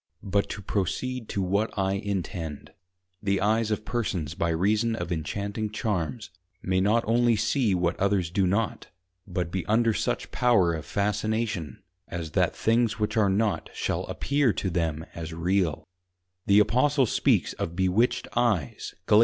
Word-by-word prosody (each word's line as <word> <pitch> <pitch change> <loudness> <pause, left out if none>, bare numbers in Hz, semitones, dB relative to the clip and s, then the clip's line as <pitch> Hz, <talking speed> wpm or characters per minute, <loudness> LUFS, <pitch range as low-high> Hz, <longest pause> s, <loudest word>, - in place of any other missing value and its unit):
But 100 +1 0
to 105 - -6
proceed 110 +6 -2
to 100 - -1
what 100 +4 0
I 95 0 +1
intend; 95 -6 -4 0.5
the 100 -2 +1
Eyes 110 +2 +2
of 105 0 -2
Persons 90 - -2
by 85 - -1
reason 105 +7 +1
of 105 - -4
Inchanting 100 +6 -3
Charms, 105 0 -3 0.3
may 95 0 +1
not 110 +4 +3
only 120 +1 +3
see 110 0 +1
what 90 -1 0
others 95 -4 +1
do 95 0 +2
not, 100 +4 -1 0.4
but 90 -2 -3
be 95 -2 -2
under 115 +1 +3
such - - -2
power 110 -9 +3
of 80 -1 -5
Fascination, 105 - -1 0.2
as 85 -3 -5
that - - +1
things 115 0 +2
which 105 -1 -1
are 105 -3 +3
not, 105 +2 0
shall - - -1
appear 140 -3 +1
to 95 - -2
them 80 -2 -1
as 80 -1 -6
real: 85 -1 0 0.6
The 100 +1 +6
Apostle 130 +6 +3
speaks - - +2
of 85 - -4
Bewitched 95 +6 +1
Eyes, 110 - 0
_Gal. 105 - +6
100 Hz, 155 wpm, -27 LUFS, 90-110 Hz, 0.6 s, The